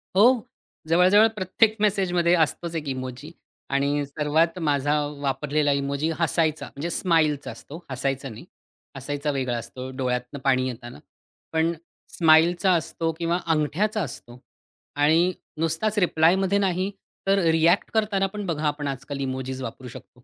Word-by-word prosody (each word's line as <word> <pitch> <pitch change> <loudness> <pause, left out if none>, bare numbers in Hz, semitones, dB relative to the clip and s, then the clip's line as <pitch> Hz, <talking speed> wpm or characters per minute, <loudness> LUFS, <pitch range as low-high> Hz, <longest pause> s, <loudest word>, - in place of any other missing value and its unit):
हो. 235 +3 +5 0.4
जवळ-जवळ 185 +6 +6
प्रत्येक 210 +3 +2
मेसेजमध्ये 180 -4 +2
असतोच 165 +1 0
एक 155 -3 -4
इमोजी. 130 +4 -6 0.4
आणि 140 +1 0
सर्वात 155 +4 0
माझा 145 -2 +1 0.3
वापरलेला 145 +2 0
इमोजी 140 +2 -1
हसायचा, 160 -2 +1
म्हणजे 150 +5 -5
स्माईलचा 160 -5 +1
असतो. 160 +5 -11
हसायचा 135 +1 -2
नाही, 110 - -11 0.5
हसायचा 145 +2 -3
वेगळा 130 -3 -2
असतो, 130 +2 -7
डोळ्यातनं 125 +1 -2
पाणी 130 -1 +2
येताना. 120 - -8 0.5
पण 160 +1 +2 0.4
स्माईलचा 170 +3 +5
असतो 165 0 -1
किंवा 170 +1 0
अंगठ्याचा 165 +7 0
असतो 120 -3 -9 0.6
आणि 160 +5 +3 0.3
नुसताच 165 +7 -1
रिप्लायमध्ये 185 +2 +3
नाही, 190 0 0 0.4
तर 195 0 +4
रिएक्ट 165 +4 +3
करताना 205 -3 +1
पण 210 -1 -5
बघा, 160 -3 -3
आपण 145 -1 -2
आजकाल 135 +1 -5
इमोजीज 130 0 -4
वापरू 125 +1 -7
शकतो 125 +1 -13
155 Hz, 130 wpm, -24 LUFS, 135-175 Hz, 0.6 s, जवळ-जवळ